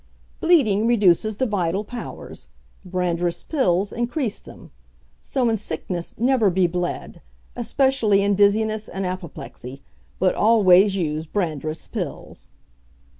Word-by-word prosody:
"Bleeding 230 - +3
reduces 215 -2 +3
the 260 - 0
vital 195 -3 -1
powers; 240 +3 -8 0.4
Brandreth's 175 -2 -2
Pills 200 - 0
increase 240 -1 -2
them. - - -14 0.5
So 260 -3 -1
in 225 -1 +1
sickness 175 -2 -5
never 240 -3 +3
be 185 0 +2
bled, 175 0 -3 0.3
especially 255 -8 +2
in 200 0 +2
Dizziness 215 +2 +2
and 195 0 -4
Apoplexy, 155 - -7 0.3
but 185 -1 +2
always 200 -3 +5
use 155 -3 -2
Brandreth's 155 -4 -3
Pills. - - -6
195 Hz, 115 wpm, -22 LUFS, 175-220 Hz, 0.5 s, always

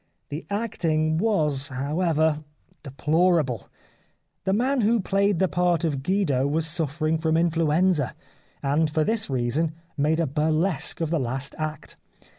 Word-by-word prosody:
The 150 +3 -6
acting 165 -7 0
was, 150 -10 +1
however, 155 +3 0 0.4
deplorable. 150 - +1 0.8
The 190 - +1
man 255 +5 +1
who 225 +2 +3
played 200 0 +1
the 190 - +2
part 175 -2 +1
of 145 -5 -1
Guido 145 -6 +1
was 155 +2 0
suffering 160 -1 0
from 160 0 +1
influenza, 165 -2 +2 0.5
and 150 +3 +2
for 155 +1 +1
this 220 +1 0
reason 135 +5 0 0.2
made 155 +2 +1
a 165 - +2
burlesque 155 +4 0
of 165 -1 -1
the 165 - +1
last 130 +2 -2
act. 155 -1 -5
160 Hz, 135 wpm, -25 LUFS, 145-180 Hz, 0.8 s, who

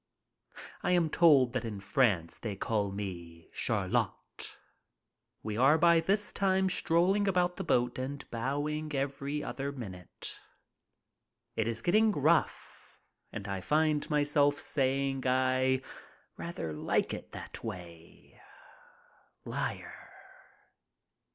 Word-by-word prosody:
I - - +1
am 170 -3 +2
told 140 -8 +5
that 125 -2 -1
in 110 -3 -5
France 100 -4 +1
they 105 -4 -4
call 100 0 -1
me 85 -5 -7
Chariot. - - -2 0.9
We 105 -1 -3
are 135 +6 +5
by 170 0 +5
this 205 +5 +1
time 190 -1 +2
strolling 180 +5 +2
about 180 -2 +2
the - - -3
boat 120 +1 +1
and 140 +2 -5
bowing 145 +5 -2
every 140 +2 -2
other 140 +1 -3
minute. 95 -10 -7 1.2
It 110 -1 0
is 115 0 -2
getting 215 +5 +4
rough 155 +2 0 0.3
and 105 -1 -6
I 100 -1 -3
find 150 - +1
myself 145 -1 +3
saying 135 -1 0
I 130 0 +2 0.6
rather 125 - -5
like 75 - 0
it - - -7
that - - -7
way. 85 -6 -10 1.0
Liar. - - -5
135 Hz, 110 wpm, -31 LUFS, 110-155 Hz, 1.2 s, told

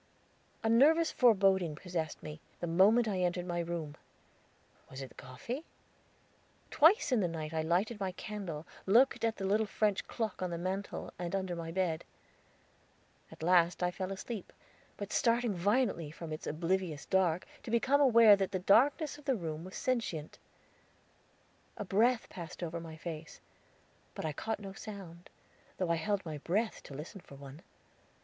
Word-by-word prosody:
A - - +1
nervous 305 +9 +5
foreboding 195 - +4
possessed 165 -2 -4
me, 150 +1 -8 0.2
the - - -2
moment 200 +8 +4
I 195 -3 -1
entered 180 0 0
my 175 -1 -2
room. 165 -3 -4 0.9
Was 130 - -8
it 135 -1 -6
the - - -18
coffee? 235 - -6 1.1
Twice 325 - +5
in 250 - +4
the 185 - +2
night 160 -2 -5
I 160 - 0
lighted 185 +8 0
my 190 -2 -1
candle, 180 -7 -6 0.2
looked 240 +7 +4
at 225 -1 +1
the 195 - -4
little 210 +3 +2
French 210 -2 0
clock 220 -5 -3
on 185 - -1
the 170 - -3
mantel, 190 +3 -4
and 175 +1 -2
under 190 -2 -2
the 165 -1 -5
bed. 170 -3 -1 1.3
At - - -10
last 175 0 +4
I 180 - +2
fell 185 +1 -4
asleep, 200 +1 -6 0.5
but 205 - -6
starting 235 -2 +2
violently 200 - +1
from 155 +1 -7
its 155 - -6
oblivious 165 -1 -1
dark, 185 -2 +2 0.2
to - - -9
become 265 +5 +3
aware 230 -6 +8
that 195 -1 -1
the - - +2
darkness 275 - +3
of 295 - -17
the 270 -2 +2
room 160 -5 -4
was 185 +1 -9
sentient. 225 - -2 1.4
A 210 - -4
breath 225 +6 +2
passed 170 0 -8
over 170 0 -3
my 160 -1 -9
face; 160 -1 -7 0.8
but - - -4
I 155 - -1
caught 220 +8 -3
no 195 -2 -8
sound, 195 -5 -9 0.5
though 180 -3 0
I - - +3
held 195 +4 -1
my 155 -2 -5
breath 210 +9 -1
to 140 - -9
listen 170 +7 -8
for 140 - -14
one. 140 +2 -11
185 Hz, 170 wpm, -32 LUFS, 165-220 Hz, 1.4 s, aware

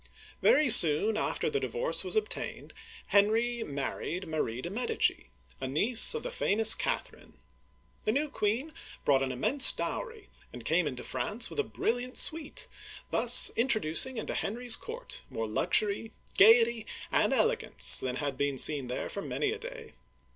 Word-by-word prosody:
Very 310 - +3
soon 205 0 +6
after 225 - -3
the 435 -2 -2
divorce 480 +3 -1
was - - -2
obtained, 435 0 -5 0.4
Henry 225 +4 0
married 150 +5 -6
Marie 150 -7 -4
de* 170 +7 -7
Medici, 225 - -2 0.3
a 130 - -5
niece 220 - +4
of 460 - -6
the - - -6
famous 220 - +3
Catherine. - - -5 0.7
The 215 - 0
new 285 +6 -2
queen 250 +5 -4 0.3
brought 135 -2 +2
an 135 -1 -3
immense 230 - +5
dowry, 455 -3 -6 0.2
and 120 -2 -12
came 165 0 0
into 125 -3 -7
France 205 - -3
with - - -7
a - - +1
brilliant 245 - -4
suite, 315 -1 0 0.4
thus - - +7
introducing 230 0 +2
into 220 - -5
Henry's 235 +2 -2
court 475 +2 -6
more 115 0 -5
luxury, 205 - -1 0.2
gayety, 225 +1 +3 0.2
and - - 0
elegance - - +2
than 125 -1 -5
had 140 -1 -5
been 140 -1 -3
seen 140 -1 +2
there 125 - -5
for 200 - -7
many 415 - -3
a 440 - -7
day. - - -11
220 Hz, 155 wpm, -28 LUFS, -, 0.7 s, thus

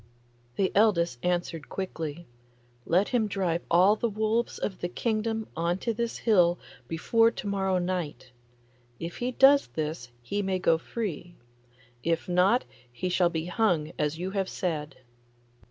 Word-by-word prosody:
The 190 - +1
eldest 170 - +3
answered 175 -3 -2
quickly, 170 -4 -5 0.6
'Let 185 +5 +3
him 235 -4 +1
drive 185 -4 -1
all 185 +5 +5
the 235 +2 -1
wolves 220 +3 0
of 190 - -4
the 175 - -2
kingdom 220 +2 -1
on 170 +2 0
to 230 +4 -2
this 235 +1 -2
hill 180 -6 +3 0.3
before 225 - +3
to 230 - -8
morrow 190 -2 0
night. 175 -8 -3 0.7
If 170 +1 -6
he 245 +1 -1
does 275 +2 +6
this 150 -6 -4
he 205 +12 -2
may 190 -1 0
go 165 -3 +2
free; 175 -4 -5 0.7
if 165 0 0
not 185 +7 +3 0.3
he 180 +10 -3
shall 180 -1 +3
be 160 -1 -3
hung 175 -5 +1
as 150 +1 0
you 185 +3 -3
have 195 -1 -1
said. 155 -5 -3
185 Hz, 150 wpm, -28 LUFS, 170-215 Hz, 0.7 s, does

